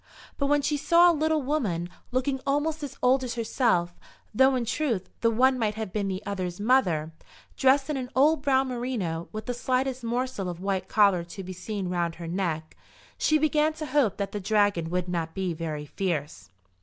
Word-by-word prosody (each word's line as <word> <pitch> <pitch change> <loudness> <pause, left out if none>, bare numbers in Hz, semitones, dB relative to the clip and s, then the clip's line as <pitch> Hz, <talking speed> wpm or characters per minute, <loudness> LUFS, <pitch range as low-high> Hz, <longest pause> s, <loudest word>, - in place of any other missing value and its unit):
But 280 - +1
when 290 0 +2
she 295 +1 +1
saw 345 +4 +5
a - - 0
little 310 -1 +1
woman, 220 - -1 0.2
looking 260 +1 -1
almost 295 +3 0
as 285 -3 -6
old 260 +1 +4
as 245 -1 -4
herself, 220 -7 0 0.3
though 265 +4 +5
in 245 -2 -1
truth 235 -6 -1
the 230 - +3
one 255 +3 +3
might 215 -2 0
have 215 -4 -5
been 205 -2 -1
the 190 +1 -4
other's 185 -3 -4
mother, 185 -10 +2 0.4
dressed 270 +1 +3
in 300 -2 -2
an 250 -1 -4
old 295 +3 +4
brown 270 -1 +2
merino, 235 -10 -3
with 215 0 -6
the 245 - -2
slightest 255 +1 -1
morsel 235 -4 -2
of 175 -1 -6
white 195 0 -2
collar 200 -5 +4
to 190 +3 -8
be 185 0 -7
seen 195 +1 -4
round 175 -2 -1
her 170 0 -7
neck, 165 -3 -3 0.4
she 310 - +3
began 310 0 +2
to 310 0 -6
hope 275 -7 +1
that 200 -1 -3
the 205 - -3
dragon 205 -4 +1
would 180 +1 -1
not 165 -2 -3
be 190 -3 -1
very 155 -2 -4
fierce. 145 - -3
220 Hz, 195 wpm, -27 LUFS, 180-265 Hz, 0.4 s, saw